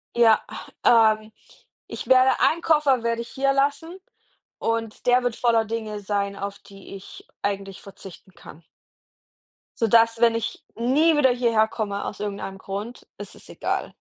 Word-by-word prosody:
Ja, 225 -2 +5 0.4
ähm, 220 -2 +4 0.6
ich - - -8
werde 260 0 +4
1 335 +2 +2
Koffer 300 -7 +2
werde 235 0 -1
ich 235 - -9
hier 275 0 0
lassen 290 +6 -1 0.6
und 225 -1 -3
der 250 0 +3
wird 245 -2 -1
voller 230 -2 +2
Dinge 215 -1 -5
sein, 200 0 -2
auf 200 0 -6
die 195 0 -13
ich 195 - -13 0.2
eigentlich 195 -1 -4
verzichten 195 -1 -14
kann. 165 -1 -15 1.2
Sodass, 230 +1 +3
wenn 230 -1 +4
ich 230 - -4
nie 290 +8 +2
wieder 275 -3 +4
hierher 230 -3 +2
komme, 205 -3 -4
aus 200 - -6
irgendeinem 200 -2 -5
Grund, 200 +6 -7
ist - - -9
es - - -17
egal. - - -4
230 Hz, 150 wpm, -23 LUFS, 200-250 Hz, 1.2 s, Ja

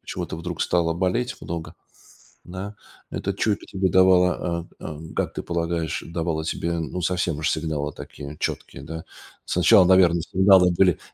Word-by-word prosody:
почему-то - - -5
вдруг 85 0 -5
стало 85 -2 +1
болеть 95 +8 -1
много, 85 -1 -6 0.7
да, 95 +4 -7 0.4
это 100 - -2
чуйка 100 +1 -1
тебе 95 -1 -1
давала, 90 -2 +3
э - - -8
э, 75 -1 -6 0.2
как - - -1
ты - - -4
полагаешь, 85 -1 -2
давала 80 -1 -2
тебе, 85 +1 -2
ну, 85 +3 -4
совсем 90 -3 0
уж 80 - 0
сигналы, 75 -2 -2
такие 70 +1 -9
четкие, 70 - -4
да? 80 +2 -7 0.4
Сначала, 90 +2 +5
наверное, 90 -2 +5
сигналы 95 0 +5
были, 90 -4 +4
85 Hz, 150 wpm, -24 LUFS, 80-95 Hz, 0.7 s, Сначала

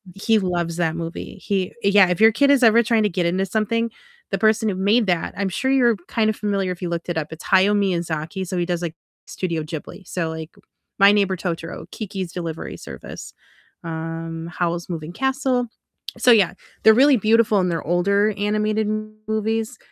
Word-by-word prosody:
he 220 +2 +2
loves 175 -3 -2
that 165 -1 0
movie, 165 0 -6
he 190 -2 -1
yeah, 200 -2 +6
if 180 +4 -1
your 225 0 +8
kid 280 +5 +3
is 275 -3 +4
ever 230 +1 +6
trying 225 -1 +2
to 210 - +2
get 175 -1 -1
into 185 +3 +1
something, 225 +3 0 0.4
the - - 0
person 220 0 +2
who 190 - -2
made 205 +4 +2
that, 175 -2 0
I'm 200 -1 -1
sure 265 +8 -2
you're 240 -5 +3
kind 220 -1 +1
of 215 - -1
familiar 200 -3 -1
if 180 - -7
you 175 - -2
looked 170 +1 -4
it 170 - -2
up, 155 -1 -2
it's 160 - -11
Hayao 195 +2 +4
Miyazaki, 175 -1 -2
so 185 - -3
he 175 - 0
does, 175 -1 -2
like, 165 -2 -4 0.3
Studio 170 -4 -3
Ghibli, 165 +4 -8
so, 165 -3 -2
like, 160 +3 -7 0.4
My 200 +1 +8
Neighbor 200 -2 +2
Totoro, 165 -1 -5
Kiki's 195 -4 -5
Delivery 165 -2 -5
Service, - - -9 0.5
um, 165 0 -5
Howl's 175 0 -1
Moving 165 -1 -5
Castle, 260 +1 0 0.5
so 245 - +5
yeah, 195 -6 +5 0.3
they're 220 - +8
really 270 +2 +5
beautiful 215 -1 +3
and 180 -1 +1
they're 165 -3 -2
older 200 +5 +2
animated 215 +1 0 0.4
movies, 220 +2 -1
195 Hz, 190 wpm, -22 LUFS, 170-220 Hz, 0.5 s, your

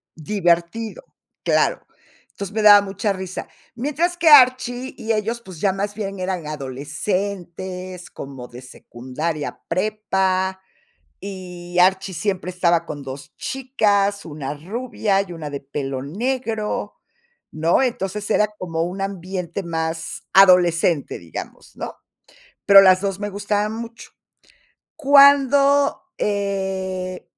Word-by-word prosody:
divertido, 175 - -1 0.4
claro. - - +1 0.4
Entonces, 200 0 -7
me 220 - 0
daba 205 -1 +9
mucha 200 +1 -2
risa. 190 -1 -6 0.3
Mientras 305 +8 -1
que 335 -1 0
Archie 255 -2 +5
y 225 0 -1
ellos, 225 +3 -2
pues, 185 -7 -11
ya 195 - +3
más 200 +1 -3
bien 195 -3 -5
eran 185 -3 -3
adolescentes, 180 +6 -4
como 135 -3 -9
de 125 +1 -11
secundaria, 130 +5 -5
prepa, 190 -1 0 0.6
y 180 -2 -7
Archie 190 0 +3
siempre 185 +1 -2
estaba 170 -2 +1
con 145 -2 -6
2 135 0 -9
chicas, 205 -6 0
una 145 -2 -5
rubia 205 - -1
y 180 -3 -9
una 155 -3 -6
de 140 - -5
pelo 135 -1 -4
negro, 225 - -3 0.6
¿no? 165 +10 +2
Entonces, 210 -4 -2
era 210 -1 +3
como 165 -2 -3
un 185 +3 -5
ambiente 185 -1 -4
más 160 -1 -4
adolescente, 175 -5 +4
digamos, 85 - -9
¿no? - - -6 0.7
Pero 200 -1 +10
las 185 0 +5
2 195 -1 -2
me 205 0 -3
gustaban 205 +1 -1
mucho. 230 0 -8 0.9
Cuando, 280 -1 +5 0.2
eh 190 -2 -2
190 Hz, 120 wpm, -21 LUFS, 170-210 Hz, 0.9 s, Pero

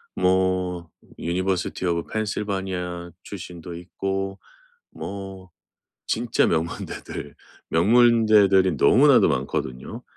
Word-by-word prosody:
뭐 90 -2 +1 0.3
university 90 +1 -2
of 85 -1 -1
Pennsylvani 95 -5 -3
출신도 90 -3 -8
있고 95 +2 -4 0.5
뭐 95 -1 -8 0.6
진짜 115 +1 +1
명문대들 80 0 -4 0.4
명문대들이 105 -1 +5
너무나도 - - +6
많거든요. 65 -1 -3
95 Hz, 290 characters per minute, -24 LUFS, 85-100 Hz, 0.6 s, 너무나도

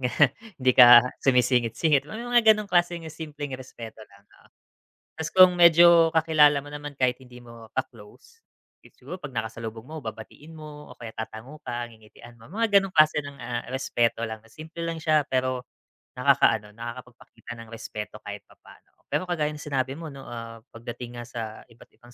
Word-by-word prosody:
ganyan 125 +2 +3 0.3
hindi 130 -1 +3
ka 120 -1 +9 0.2
sumisingit-singit, 125 +3 +2
may 220 +2 -6
mga 240 -2 +5
gano'ng 210 0 -5
klaseng 175 -1 +1
simpleng 150 -2 -7
respeto 115 -4 -11
lang, 100 0 -22
oo. - - -24 0.7
'Tas 160 -1 -3
kung 185 -1 +7
medyo 170 0 +7
kakilala 155 -2 +4
mo 145 - -12
naman 145 -1 -7
kahit 130 -1 +1
hindi 125 -1 -14
mo 115 -1 -13
ka-close, 125 - -7 0.4
it - - -21
siguro 160 +9 -9
pag 150 - -7
nakasalubong 110 0 -5
mo 155 +2 -8
babatiin 115 +8 -10
mo, 150 -1 -11
o - - -12
kaya 115 -2 -8
tatango 110 +7 -8
ka 120 0 -3
ngingitian 110 +2 -16
mo, 115 - -15
mga 205 0 +3
gano'ng 195 -1 -7
klase 155 0 +5
ng, 140 -1 -10
ah, 120 0 -3
respeto 120 -3 -1
lang 110 -1 -6
simple 160 +4 -10
lang 165 - -3
siya, 155 -2 +3
pero 130 -1 -1 0.5
nakakaano, 125 -5 +2
nakakapagpakita 120 +1 -10
ng 115 -1 -11
respeto 105 -1 -8
kahit 105 -1 -8
papaano. - - -20 0.2
Pero - - 0
kagaya 155 -4 -1
ng 150 - -9
sinabi 135 -1 -2
mo 160 -3 -8
no, 135 -2 -11
ah, 115 -1 -8
pagdating 120 +1 -9
nga 120 - -7
sa 120 -1 -7 0.3
iba't-ibang 120 +1 -19
130 Hz, 170 wpm, -25 LUFS, 115-155 Hz, 0.7 s, ka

